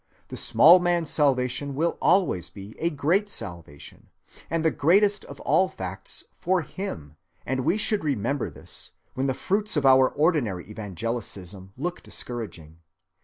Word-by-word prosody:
A - - -5
small 170 +4 +7
man's 175 -3 0
salvation 135 -1 +1
will 165 +4 0
always 180 - +2
be 100 +1 -11
a 170 - +1
great 170 +7 +1
salvation 85 - -6 0.4
and 165 0 -1
the 160 - +4
greatest 200 +8 +3
of - - -11
all 190 0 +3
facts 95 - -7 0.2
for 180 -1 +1
him, 80 - -7 0.3
and 130 +1 -1
we 185 - +2
should 210 -2 0
remember 140 -1 -1
this - - -5 0.2
when 130 +1 -1
the 130 - 0
fruits 205 +1 -1
of 145 - +1
our 130 -1 +6
ordinary 145 - 0
evangelicism 100 -2 -5
look 175 +6 -3
discouraging. 85 -10 -4
135 Hz, 145 wpm, -25 LUFS, -, 0.4 s, small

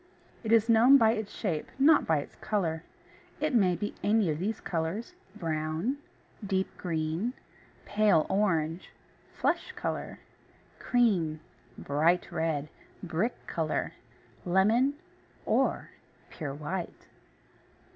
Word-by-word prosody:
It 220 - -2
is 225 -1 +5
known 235 +4 +7
by 225 -4 +5
its 220 -2 -3
shape, 170 -8 -3
not 290 +3 +5
by 160 - +3
its - - -11
colour. 165 -7 -1 0.6
It 305 -1 0
may 190 -7 +4
be 205 +5 -4
any 210 -5 +3
of 150 - -3
these 210 +5 -2
colours 170 +5 -3 0.2
brown, 160 - -2 0.5
deep 190 -1 -1
green, 165 +6 -2 0.5
pale 205 -6 +3
orange, 170 -4 0 0.4
flesh - - -1
colour, - - -4 0.6
cream, 185 -11 +2 0.4
bright 165 +5 +1
red, 160 -3 -1 0.4
brick 180 +7 -2
colour, 160 -2 -2 0.5
lemon, 220 +10 +3 0.5
or - - +1 0.4
pure 145 -4 -5
white. 165 +4 -5
185 Hz, 110 wpm, -29 LUFS, 160-220 Hz, 0.6 s, known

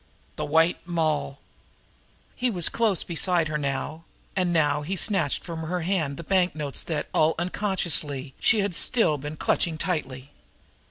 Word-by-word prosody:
"The - - -3
White 160 +3 +3
Moll!" 155 -5 -1 1.0
He 250 0 0
was 180 -7 0
close 220 -6 +1
beside 170 -1 +2
her 150 - -1
now, 145 +3 -3 0.3
and 180 -2 +1
now 150 -3 +2
he 175 +6 -3
snatched 180 -7 +1
from 165 -2 -6
her 175 +3 -2
hand 160 -6 -1
the - - -6
banknotes 165 -6 0
that, 155 -3 -2
all 155 +1 +3
unconsciously, 170 -7 -1
she 220 - +3
had 200 -2 -1
still 165 - +3
been 150 +3 -6
clutching 160 +1 0
tightly. 140 -7 -3
165 Hz, 150 wpm, -26 LUFS, 150-180 Hz, 1.0 s, White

